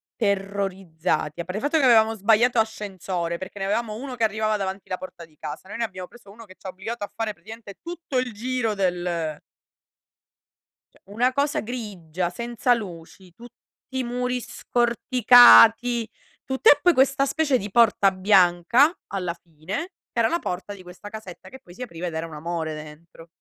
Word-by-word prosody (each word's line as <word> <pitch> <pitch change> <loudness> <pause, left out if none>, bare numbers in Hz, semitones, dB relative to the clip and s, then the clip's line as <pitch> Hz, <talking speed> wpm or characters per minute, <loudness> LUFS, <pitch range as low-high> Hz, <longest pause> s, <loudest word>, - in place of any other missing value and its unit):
terrorizzati. 190 - -2
A - - -2
parte 185 +3 -5
il - - -4
fatto 295 +3 +2
che 290 - +1
avevamo 225 -3 +5
sbagliato 225 +4 +3
ascensore, 190 -6 -3
perché 190 +2 -9
ne 195 - -2
avevamo 215 +1 -1
1 255 +2 -7
che 230 - -2
arrivava 215 0 +1
davanti 195 0 -5
la 185 - -2
porta 180 -2 -10
di 155 -2 -27
casa. 155 +4 -7
Noi 215 - -6
ne 235 - -1
abbiamo 185 -4 -6
preso 205 -3 -17
1 230 +2 -13
che 185 -1 -16
ci - - -26
ha - - -4
obbligato 205 +4 -6
a - - -6
fare 220 -2 -2
praticamente 205 +2 -12
tutto 340 -6 -5
il 250 -3 -1
giro 235 0 -2
del 175 -5 -2 1.5
Cioè, - - -25
una 240 +6 0
cosa 285 +1 0
grigia, 185 -8 -4
senza 235 +5 0
luci, 180 -3 -8
tutti 240 +4 -15 0.4
i 260 - 0
muri 250 +1 -2
scorticati, 240 -1 +5 0.4
tutte 265 +12 +5
e - - +4
poi 355 -1 +5
questa 270 +1 +3
specie 280 -1 +1
di 205 -3 -6
porta 210 -4 +4
bianca, 190 - +4
alla 180 -3 -3
fine, 170 - -7 0.2
che - - -3
era 225 - +4
la 340 - 0
porta 185 +3 -5
di 190 - -12
questa 180 +3 -11
casetta, 215 -5 -10
che 265 - -12
poi 175 - -16
si 250 - -13
apriva 180 -6 -6
ed 170 - -5
era 160 - -3
un 160 - -12
amore 160 0 -4
dentro. 155 +2 -12
205 Hz, 185 wpm, -24 LUFS, 180-240 Hz, 1.5 s, avevamo